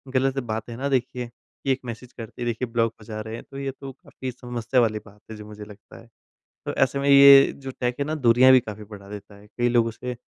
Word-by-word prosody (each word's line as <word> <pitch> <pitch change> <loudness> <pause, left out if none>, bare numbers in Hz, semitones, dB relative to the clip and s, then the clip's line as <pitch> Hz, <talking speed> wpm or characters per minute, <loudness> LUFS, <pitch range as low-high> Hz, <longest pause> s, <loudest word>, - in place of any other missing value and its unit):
गलत 135 +1 +1
बात 110 -2 -5
है 115 - -7
ना 140 +2 -2
देखिए 125 -2 -2
कि 125 +3 -7
1 130 - 0
मैसेज 120 +1 -8
करते 115 +1 -10
ही - - -2
देखिए 120 +1 -2
ब्लॉक 115 -1 0
हो - - -14
जा 110 -1 -6
रहे 110 +1 -7
हैं - - -9
तो 135 - -9
ये 135 -1 -3
तो 135 - -7
काफ़ी 130 0 -9
समस्या 125 0 -1
वाली 110 -2 0
बात 105 0 -17
है - - -7
जो 105 - -10
मुझे 105 0 -10
लगता 105 -1 -15
है। 115 - -19 0.6
तो - - -3
ऐसे 140 - +1
में 140 - -2
ये 140 0 +8
जो 135 -1 -8
टेक 125 -1 -1
है 140 - 0
ना 155 +1 -3
दूरियाँ 130 -1 +5
भी 130 - +7
काफ़ी 110 -3 -9
बढ़ा 100 -1 -12
देता 105 0 -10
है। 100 +1 -17
कई 120 +3 -1
लोगों 120 -1 +2
उसे 125 +2 -6
120 Hz, 265 wpm, -24 LUFS, 110-130 Hz, 0.6 s, ये